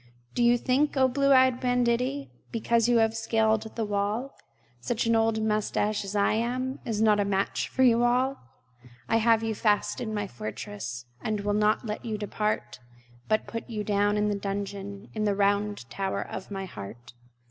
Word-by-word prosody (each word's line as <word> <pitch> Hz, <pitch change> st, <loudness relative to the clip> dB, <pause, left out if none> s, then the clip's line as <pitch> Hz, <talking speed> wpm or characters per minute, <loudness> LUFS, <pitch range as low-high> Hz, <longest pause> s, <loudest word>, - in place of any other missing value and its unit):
Do 240 Hz, -, +1 dB
you 240 Hz, +1 st, +5 dB
think, 275 Hz, +4 st, +1 dB
o 260 Hz, 0 st, +5 dB
blue 275 Hz, +2 st, +2 dB
eyed 260 Hz, -1 st, +5 dB
banditti, 250 Hz, +2 st, 0 dB, 0.2 s
Because 230 Hz, 0 st, +1 dB
you 240 Hz, -, +4 dB
have 225 Hz, 0 st, +3 dB
scaled 220 Hz, -1 st, +2 dB
the 225 Hz, -, -1 dB
wall, 210 Hz, +6 st, -1 dB, 0.5 s
Such 230 Hz, -, -1 dB
an 230 Hz, 0 st, +3 dB
old 225 Hz, -1 st, +2 dB
mustache 210 Hz, -1 st, 0 dB
as 200 Hz, +1 st, -6 dB
I 200 Hz, 0 st, +3 dB
am 255 Hz, +4 st, -1 dB
Is 220 Hz, -1 st, 0 dB
not 210 Hz, -1 st, +4 dB
a -, -, +3 dB
match 195 Hz, 0 st, -1 dB
for 260 Hz, -, +1 dB
you 240 Hz, -1 st, +5 dB
all! 255 Hz, +3 st, +2 dB, 0.7 s
I 225 Hz, -, +3 dB
have 225 Hz, 0 st, +3 dB
you 225 Hz, 0 st, -1 dB
fast 210 Hz, +4 st, +1 dB
in 225 Hz, -3 st, -3 dB
my 205 Hz, -1 st, -2 dB
fortress, 120 Hz, -, -6 dB, 0.2 s
And 215 Hz, -2 st, -2 dB
will 205 Hz, 0 st, 0 dB
not 210 Hz, +3 st, +2 dB
let 210 Hz, -1 st, -4 dB
you 220 Hz, -2 st, -3 dB
depart, 210 Hz, +1 st, -2 dB, 0.5 s
But 215 Hz, 0 st, +1 dB
put 230 Hz, +1 st, -6 dB
you 215 Hz, -2 st, -3 dB
down 205 Hz, 0 st, +1 dB
into 210 Hz, 0 st, +1 dB
the 200 Hz, -, -3 dB
dungeon 200 Hz, 0 st, -5 dB
In 215 Hz, -1 st, -1 dB
the 205 Hz, -1 st, +1 dB
round 205 Hz, -, 0 dB
tower 195 Hz, -1 st, -2 dB
of 190 Hz, -, -7 dB
my 195 Hz, -1 st, -4 dB
heart. 120 Hz, -, -10 dB
215 Hz, 185 wpm, -27 LUFS, 205-235 Hz, 0.7 s, you